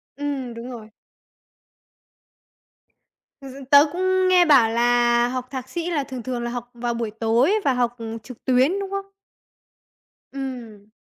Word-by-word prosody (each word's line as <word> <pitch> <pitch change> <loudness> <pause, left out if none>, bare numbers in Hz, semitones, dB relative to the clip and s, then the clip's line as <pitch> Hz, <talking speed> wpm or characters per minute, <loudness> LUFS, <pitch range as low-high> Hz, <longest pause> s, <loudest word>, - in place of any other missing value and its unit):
Ừm, 280 -4 -4
đúng 230 +2 -8
rồi. 220 -3 -10 2.5
Thực 275 - -10
sự 275 +1 -10
tớ 285 +1 +8
cũng 370 +1 +1
nghe 365 -1 +5
bảo 270 -8 +5
là 240 +1 +3
học 255 0 -4
Thạc 260 -1 -6
sĩ 345 0 -4
là 300 -5 -1
thường 260 -3 -7
thường 245 -1 -4
là 240 - -3
học 245 0 -6
vào 240 0 -3
buổi 230 -2 -3
tối 230 - +2
và 275 - +3
học, 240 -1 0
ừ, 225 -1 -6
trực 250 0 -13
tuyến, 265 +9 +2
đúng 395 -1 -4
không? 395 0 -3 1.3
Ừm. 240 -7 -7
250 Hz, 160 wpm, -22 LUFS, 235-285 Hz, 2.5 s, tớ